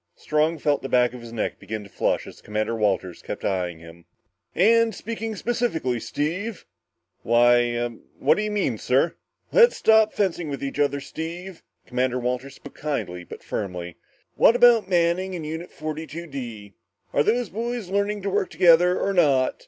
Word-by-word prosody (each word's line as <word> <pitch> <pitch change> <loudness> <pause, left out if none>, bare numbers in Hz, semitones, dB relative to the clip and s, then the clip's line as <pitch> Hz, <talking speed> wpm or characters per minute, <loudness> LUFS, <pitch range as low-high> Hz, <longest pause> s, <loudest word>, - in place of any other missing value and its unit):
Strong 155 +2 0
felt 145 -1 +1
the 135 - -5
back 125 -1 +3
of 125 - -9
his 115 -1 -10
neck 115 -2 -3
begin 110 -1 -6
to - - -12
flush - - 0
as - - -12
Walters 105 -4 -1
kept - - -6
eyeing 90 -3 -1
him. 85 +1 -14 0.5
"And 225 +4 +4
speaking 225 -1 -5
specifically, 205 - -1
Steve?" 180 - -3 0.6
"Why 120 0 +4
ah 120 0 -1 0.3
what 140 - +3
do - - 0
you 215 - -1
mean, 190 - -1
sir?" 135 +7 +2 0.4
"Let's 480 0 +6
stop 220 -1 +5
fencing 175 -5 -1
with 140 -1 -5
each 140 +1 -4
other, 140 -1 +1
Steve." 170 +5 -7 0.3
Walters 125 +1 -1
spoke 145 - -12
kindly 115 -12 -4
but - - -11
firmly. 90 -4 -5 0.4
"What 230 - +5
about 240 -5 +5
Manning 180 +1 +1
and 165 -3 -5
Unit 160 +3 -5
42 155 +2 -6
D? 120 -9 -8 0.4
Are - - +3
those 230 +5 +1
boys 230 0 -4
learning 200 +1 -1
to 200 - -1
work 190 -1 0
together 175 +1 +5
or 195 - 0
not? 140 -8 +3
155 Hz, 165 wpm, -24 LUFS, 120-195 Hz, 0.6 s, Let's